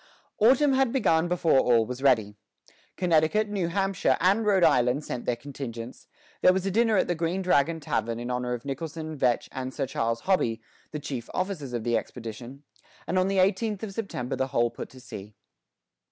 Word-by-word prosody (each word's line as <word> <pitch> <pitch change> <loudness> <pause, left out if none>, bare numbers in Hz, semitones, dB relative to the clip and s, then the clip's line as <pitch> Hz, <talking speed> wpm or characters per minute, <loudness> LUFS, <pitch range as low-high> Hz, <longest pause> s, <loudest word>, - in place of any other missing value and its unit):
Autumn 265 +6 +5
had 265 -2 +2
begun 175 -10 +2
before 170 -5 +3
all 115 -3 +3
was 125 +3 -6
ready. 110 -7 +2 0.6
Connecticut, 180 +4 +2
New 195 -4 -1
Hampshire, 195 -6 +1
and 195 +5 +3
Rhode 195 -3 +4
Island 135 -2 +3
sent 120 - -5
their 120 - 0
contingents; 120 -2 -8 0.3
there 185 - +7
was 190 0 -1
a 195 - 0
dinner 225 +1 +3
at - - +2
the 175 - +1
Green 170 +3 -2
Dragon 165 -2 +2
Tavern 115 -6 -2
in 120 +1 -4
honor 125 0 -1
of 120 - -10
Nicholson, 155 +3 -5
Vetch, 125 -4 +1
and 130 0 -5
Sir 135 0 -2
Charles 115 -3 -2
Hobby, 125 -12 +1 0.3
the 150 - -5
chief 135 -5 -6
officers 185 -8 -3
of 120 -2 -2
the 120 0 +1
expedition; 120 +4 -7 0.4
and 185 - 0
on 185 - +2
the 195 0 0
eighteenth 200 +3 +1
of 205 -3 -5
September 140 - -4
the 130 +1 -1
whole 120 -2 +1
put 120 - -8
to 130 - -14
sea. 105 -4 -10
145 Hz, 190 wpm, -27 LUFS, 125-190 Hz, 0.6 s, there